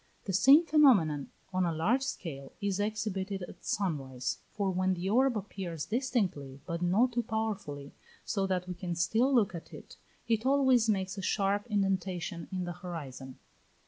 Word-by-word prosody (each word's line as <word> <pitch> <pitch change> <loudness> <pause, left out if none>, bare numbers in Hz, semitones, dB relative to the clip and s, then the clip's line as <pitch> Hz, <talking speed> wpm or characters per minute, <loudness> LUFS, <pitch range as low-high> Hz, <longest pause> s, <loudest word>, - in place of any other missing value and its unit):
The 195 - -3
same 275 - +7
phenomenon 205 - +4 0.2
on 185 0 +2
a 170 - +1
large 195 +12 +1
scale 150 - -5
is 200 -1 -1
exhibited 205 -2 -2
at - - -11
sun 185 -7 0
rise; 130 -2 -4
for 200 -2 -1
when 185 0 +1
the 180 +2 -4
orb 255 +1 +3
appears 185 -6 -5
distinctly, 200 - -1
but 170 -1 -4
not 200 +9 +3
too 240 0 0
powerfully, 205 - -4 0.3
so 195 -3 0
that 180 -1 -1
we 180 - -3
can 180 -1 -4
still 220 +10 +2
look 230 -8 +3
at 170 -1 -8
it, - - -12 0.3
it 225 -1 +1
always 260 -4 +4
makes 190 -1 0
a - - -3
sharp 200 +2 0
indentation 190 -5 -1
in 185 -1 -2
the 175 0 -4
horizon. 145 -7 -8
190 Hz, 170 wpm, -31 LUFS, 170-220 Hz, 0.3 s, same